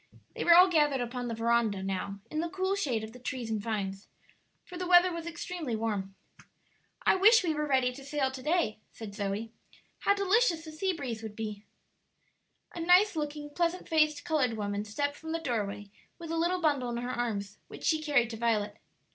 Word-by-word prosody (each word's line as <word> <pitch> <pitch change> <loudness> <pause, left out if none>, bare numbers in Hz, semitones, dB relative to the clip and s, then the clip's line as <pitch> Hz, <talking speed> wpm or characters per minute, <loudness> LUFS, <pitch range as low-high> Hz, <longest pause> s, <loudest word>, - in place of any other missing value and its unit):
They - - -2
were 340 - +7
all 365 +2 +9
gathered 295 -6 +2
upon 245 0 -3
the 230 - -3
veranda 225 -3 +1
now 195 +1 -3
in 310 - -2
the 335 +1 -1
cool 380 +2 -1
shade 265 - -1
of 220 +1 -8
the 250 - -12
trees 245 -2 -4
and 215 -2 -1
vines, 200 -3 -3 0.6
for 360 - -11
the 360 0 -3
weather 355 0 +6
was 335 0 -5
extremely 335 -6 -4
warm. 205 -3 -3 0.9
"I - - +6
wish 425 +3 +6
we 330 -3 +1
were 300 0 -2
ready 260 -3 +2
to 275 - -11
sail 280 -1 -1
to 260 0 -8
day," 300 -8 0
said 215 -3 -9
Zoe. 205 +3 -3 0.5
"How 400 - +3
delicious 395 -4 +2
the 315 - -8
sea 375 +5 -1
breeze 250 -9 -5
would 220 -2 -7
be!" 210 -1 -5 1.1
A - - -7
nice 360 +4 +5
looking, 295 -1 -4
pleasant 345 +3 -1
faced 305 -2 +2
colored 300 -8 +1
woman 205 0 -2
stepped 285 +7 -2
from 320 0 -6
the 330 - -1
doorway 205 -8 -3 0.3
with 330 -1 -7
a - - -1
little 350 +2 +1
bundle 285 -6 +1
in 235 - -3
her 245 +1 -3
arms, 215 -5 -3
which - - -11
she 315 -1 +2
carried 275 -7 +2
to 225 - -6
Violet. 215 -2 0
265 Hz, 200 wpm, -30 LUFS, 220-330 Hz, 1.1 s, all